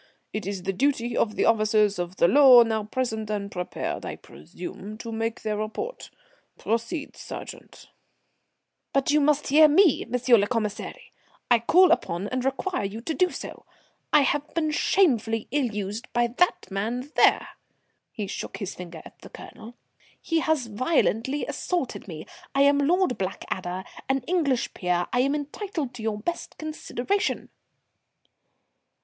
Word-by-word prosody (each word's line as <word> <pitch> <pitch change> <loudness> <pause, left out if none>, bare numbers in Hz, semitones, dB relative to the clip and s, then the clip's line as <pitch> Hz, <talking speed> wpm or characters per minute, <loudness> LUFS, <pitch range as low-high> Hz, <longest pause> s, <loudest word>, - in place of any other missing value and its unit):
It 215 -3 -4
is 195 -2 -4
the 195 +1 -1
duty 245 0 0
of 215 -2 +1
the - - +1
officers 215 -3 +3
of 175 +1 -4
the 170 - +4
law 260 +1 +8
now 220 -2 -1
present, 220 -2 -3
and 200 -1 -3
prepared, 180 -1 -4
I - - -5
presume, 180 - -9
to 230 0 -7
make 225 0 -3
their 215 -1 -1
report. 215 - -5 0.5
Proceed, 230 +7 -3
sergeant." - - -9 1.1
"But 275 0 +2
you 300 0 +4
must 295 0 +2
hear 305 +3 +7
me, 320 +1 +4
M. 250 - +1 0.2
le 200 - +1
Commissary; 230 - -4 0.4
I 240 - +6
call 355 +9 +5
upon 180 - 0
and 255 0 -2
require 270 - -1
you 200 +3 -4
to 320 +7 -3
do 365 +3 +2
so. - - -8 0.4
I 300 - +6
have 290 +2 0
been 310 -2 +1
shamefully 230 - +2
ill 280 -2 +1
used 210 +1 -5
by 240 0 +3
that 250 - 0
man 235 +8 -3
there." - - +4 0.6
He 210 - -4
shook - - -6
his 195 -4 -5
finger 170 -3 -9
at - - -14
the - - -13
Colonel. 230 +3 -11 0.4
"He 330 -1 0
has 315 -5 +1
violently 255 +2 0
assaulted 345 - -3
me. 160 -4 -8 0.3
I 275 - +5
am 285 0 +4
Lord 340 0 +2
Blackadder, 185 -1 -4 0.3
an 270 0 +1
English 310 -8 0
peer. 180 -1 0
I 245 - +2
am 275 +3 +2
entitled 300 - -4
to 245 - -9
your 220 -1 -1
best 340 +12 -5
consideration." 310 - -2
240 Hz, 155 wpm, -25 LUFS, 210-295 Hz, 1.1 s, law